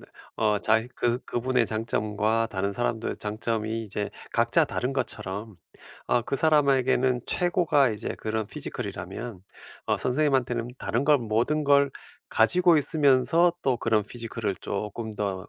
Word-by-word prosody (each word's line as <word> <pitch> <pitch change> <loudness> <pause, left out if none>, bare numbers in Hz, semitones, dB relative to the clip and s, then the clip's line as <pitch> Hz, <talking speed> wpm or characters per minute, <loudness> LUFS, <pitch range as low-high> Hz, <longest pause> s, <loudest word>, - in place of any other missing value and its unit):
네 - - -14 0.3
어 105 -2 +1
자기 110 +1 +2
그 120 0 0
그분의 125 0 0
장점과 110 0 -1
다른 100 0 -2
사람들의 115 +1 -2
장점이 110 +1 -3
이제 105 -1 -4 0.2
각자 - - +3
다른 125 +2 -3
것처럼 105 -5 -4 0.5
어 120 - +2
그 140 - -3
사람에게는 130 -4 +3
최고가 175 -6 +2
이제 105 - -5
그런 110 -1 -2
피지컬 - - -6
이라면 115 -6 -7 0.5
어 - - +1
선생님한테는 125 -4 0
다른 115 +6 -1
걸 150 -2 +5
모든 120 +7 0
걸 140 -1 +4 0.4
가지고 175 +8 +4
있으면서 150 +3 +4
또 130 -3 +1
그런 110 -3 +1
피지컬을 115 -3 -4
쪼끔 105 +2 -5
더 95 -3 -3
115 Hz, 305 characters per minute, -26 LUFS, 110-135 Hz, 0.5 s, 걸